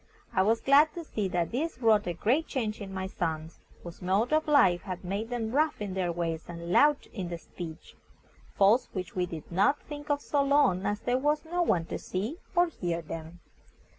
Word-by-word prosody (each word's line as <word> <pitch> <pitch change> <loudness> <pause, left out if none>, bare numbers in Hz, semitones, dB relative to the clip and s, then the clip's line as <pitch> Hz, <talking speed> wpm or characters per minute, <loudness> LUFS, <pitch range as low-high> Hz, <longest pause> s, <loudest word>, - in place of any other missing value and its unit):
I 190 - +3
was 225 +4 +2
glad 290 +3 +5
to 340 - -5
see 215 -10 -2
that 175 -2 -1
this 315 +7 -2
wrought 220 -5 +3
a 175 - -1
great 250 - +1
change 220 -5 -3
in 195 -1 -6
my 190 0 -3
sons, 165 -3 -4 0.2
whose 170 -1 -10
mode 195 +9 +1
of 310 0 +2
life 190 -13 +5
had 185 -2 -6
made 200 +5 -3
them 230 -3 -2
rough 305 +4 +1
in 205 -3 -4
their 185 -2 0
ways 165 -1 -3
and 170 0 -6
loud 290 +8 +4
in 185 -5 -4
their 170 - -4
speech 165 -1 -9 0.6
faults 205 +6 +4
which 185 -3 -5
we 180 -1 0
did 165 -2 -8
not 200 +11 +3
think 295 0 -8
of 290 -1 +2
so 285 0 0
long 275 -10 +3
as 205 0 -1
there 250 +1 +1
was 295 +3 +1
no 350 +2 -1
one 175 - +2
to - - -5
see 215 - -4 0.2
or 350 0 +5
hear 175 - -3
them. 165 +2 -8
205 Hz, 210 wpm, -29 LUFS, 175-280 Hz, 0.6 s, glad